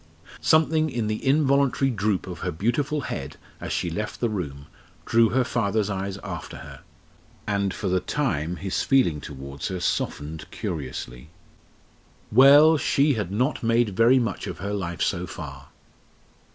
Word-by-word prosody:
Something 160 0 +3
in 120 -5 -2
the 110 0 -3
involuntary 140 -1 +3
droop 105 -3 0
of 90 -1 -7
her 95 - -2
beautiful 120 - -1
head - - -5 0.2
as - - -6
she - - -1
left - - -4
the 120 - 0
room 70 -9 -5 0.4
drew 115 -1 +4
her 130 +1 +2
father's 110 -4 0
eyes 95 0 -3
after - - -6
her, - - -11 0.6
and 100 -1 0
for 100 - -4
the 95 0 +2
time 90 - -1
his 95 +1 -2
feeling 105 - +2
towards 70 0 -7
her 95 -1 -4
softened 80 -2 -3
curiously. 65 -3 -6 1.0
Well, 145 +6 +7
she 145 +1 +2
had 105 -6 -3
not 125 +8 0
made 115 0 +2
very 120 +5 +5
much 115 -6 -2
of - - -5
her 100 +1 -4
life 85 -4 -2
so 90 -1 -1
far! 70 -6 -9
105 Hz, 150 wpm, -25 LUFS, 90-130 Hz, 1.0 s, Well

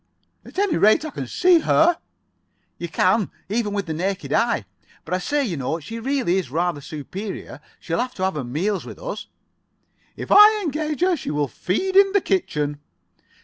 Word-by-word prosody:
"At - - -14
any 395 -4 +2
rate, 215 +9 +4
I 310 - -5
can 135 - -5
see 355 - +4
her." 330 +2 +3 0.8
[Pg 170 - -4
52]"You - - -17
can, 185 +4 +2 0.2
even 215 0 -1
with 200 -2 -2
the 160 - -3
naked 190 +4 -2
eye. 230 - +1 0.4
But 165 - -5
I 185 - +1
say, 285 +9 0
you 180 -9 -3
know, 140 +5 -2
she 225 +9 -7
really 255 -7 0
is 185 -9 -2
rather 165 +1 -1
superior. 180 +9 -7 0.2
She'll - - -3
have 250 +1 -2
to 185 - -4
have 190 - +1
her 150 -3 -4
meals 175 +11 -2
with - - -10
us." - - -6 0.9
"If - - -7
I 425 +1 +8
engage 305 -1 -2
her, 365 0 +3
she 285 - -6
will 145 -1 0
feed 290 - -2
in 390 0 +6
the 400 - +4
kitchen." 150 - -1
205 Hz, 190 wpm, -22 LUFS, -, 0.9 s, I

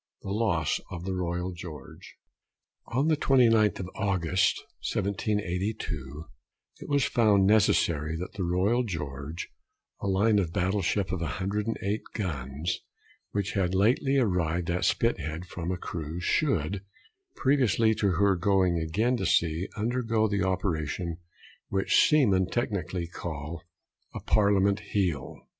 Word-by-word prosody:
THE 95 - -5
LOSS 85 -8 +1
OF 85 0 -7
THE 95 - -2
ROYAL 90 0 -2
GEORGE. 85 -6 -10 0.7
On 135 +6 0
the 160 - +4
29th 115 -8 +4
of 90 - -6
August, 95 -2 +1 0.3
1782, 95 -7 -2 0.5
it - - -9
was 140 -2 +3
found 105 -5 +3
necessary 85 -7 +3
that 90 +5 -6
the 100 -2 -3
Royal 95 +8 +2
George, 75 - -5 0.5
a - - -3
line 105 +2 +3
of 85 -5 -1
battle 95 +2 0
ship 95 +1 0
of 95 - -2
108 100 - -2
guns, 75 - -3 0.5
which 100 -1 -2
had 95 -2 0
lately 125 +7 +3
arrived 90 -7 +1
at 90 +1 0
Spithead 80 +4 0
from 90 0 -5
a 90 - -2
cruise, 85 0 -5
should, 100 - 0 0.5
previously 120 -5 +3
to 100 -3 +1
her 100 +2 +3
going 90 -1 +2
again 105 +11 +1
to - - -2
sea, 85 +3 +1
undergo 115 -1 +1
the 100 -2 -1
operation 85 -3 -1 0.5
which 95 0 +3
seamen 100 - +4
technically 95 -7 -2
call 85 -1 -6 0.5
a - - -3
Parliament 100 -1 +3
heel. 95 -9 -2
95 Hz, 130 wpm, -28 LUFS, 85-105 Hz, 0.7 s, the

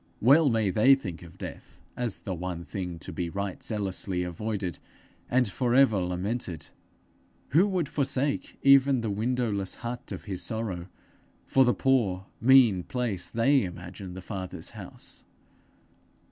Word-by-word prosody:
Well 140 +6 +6
may 110 -4 +1
they 130 +8 +6
think 95 -11 -7
of 85 +1 -13
death - - -9 0.2
as 120 -5 -2
the 95 - -5
one 85 -1 -5
thing 90 +2 -5
to 80 - -9
be 85 -1 -2
right 100 +1 -4
zealously 95 -4 -2
avoided, 95 -1 -3 0.5
and 125 -1 +3
for 120 +4 0
ever 130 -7 +5
lamented! 90 - -3 0.8
Who 170 - +5
would 185 -6 0
forsake 140 -1 -1
even 135 -2 +6
the 110 -2 -2
window 120 +3 0
less 100 -2 -2
hut 120 +1 -6
of - - -6
his 95 -4 -4
sorrow 95 -3 -3 0.6
for 135 - +4
the 125 - +3
poor 110 -9 +1 0.2
mean 120 -7 +6
place 115 -3 -3
they 135 +4 +3
imagine 90 +1 -7
the 95 - -8
Father's 95 -2 -6
house! - - -9
105 Hz, 145 wpm, -28 LUFS, 90-125 Hz, 0.8 s, Well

